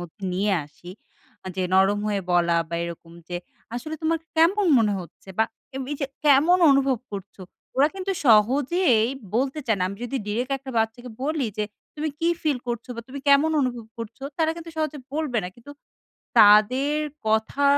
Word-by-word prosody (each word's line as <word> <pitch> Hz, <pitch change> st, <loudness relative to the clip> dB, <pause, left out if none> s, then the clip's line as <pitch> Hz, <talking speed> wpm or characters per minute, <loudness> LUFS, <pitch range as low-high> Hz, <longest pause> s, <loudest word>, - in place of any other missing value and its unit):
মধ্যে 175 Hz, +4 st, -11 dB
নিয়ে 200 Hz, +2 st, +1 dB
আসি। 175 Hz, +4 st, -13 dB, 0.7 s
যে 185 Hz, -, 0 dB
নরম 195 Hz, +2 st, +4 dB
হয়ে 205 Hz, -2 st, 0 dB
বলা 170 Hz, -1 st, +3 dB
বা 170 Hz, -, -4 dB
এরকম 170 Hz, 0 st, -8 dB, 0.2 s
যে, 175 Hz, -, -3 dB, 0.4 s
"আসলে 275 Hz, +6 st, -4 dB
তোমার 325 Hz, +1 st, +1 dB, 0.2 s
কেমন 370 Hz, +5 st, +4 dB
মনে 215 Hz, -3 st, +2 dB
হচ্ছে?" 175 Hz, +2 st, -14 dB
বা 225 Hz, -, +5 dB, 0.5 s
এই -, -, -3 dB
যে, 275 Hz, -, 0 dB, 0.2 s
"কেমন 300 Hz, +5 st, +5 dB
অনুভব 270 Hz, -3 st, +3 dB
করছো?" 195 Hz, -1 st, -8 dB, 0.3 s
ওরা 280 Hz, +3 st, +5 dB
কিন্তু 390 Hz, 0 st, -2 dB
সহজেই 245 Hz, -, +4 dB, 0.3 s
বলতে 270 Hz, +4 st, 0 dB
চায় 220 Hz, -, +2 dB
না। 180 Hz, -, -1 dB
আমি 200 Hz, -, -7 dB
যদি 255 Hz, +3 st, -3 dB
direct 245 Hz, +6 st, -1 dB
একটা 270 Hz, 0 st, -9 dB
বাচ্চাকে 225 Hz, +3 st, -2 dB
বলি 295 Hz, -2 st, 0 dB
যে 210 Hz, -, +1 dB, 0.3 s
"তুমি 310 Hz, +1 st, -2 dB
কি 335 Hz, -, +1 dB
feel 295 Hz, -5 st, +1 dB
করছো?" 235 Hz, +1 st, -4 dB
বা 235 Hz, -, -4 dB
"তুমি 280 Hz, +2 st, -7 dB
কেমন 280 Hz, +3 st, +5 dB
অনুভব 245 Hz, -4 st, -2 dB
করছো?" 230 Hz, +3 st, -8 dB, 0.2 s
তারা 320 Hz, -1 st, +2 dB
কিন্তু 335 Hz, 0 st, -8 dB
সহজে 310 Hz, -2 st, -2 dB, 0.2 s
বলবে 300 Hz, -6 st, -1 dB
না। 180 Hz, -, -3 dB
কিন্তু 240 Hz, +4 st, -12 dB, 0.7 s
তাদের 255 Hz, +8 st, +6 dB, 0.3 s
কথা 220 Hz, +6 st, +1 dB
250 Hz, 170 wpm, -24 LUFS, 210-295 Hz, 0.7 s, তাদের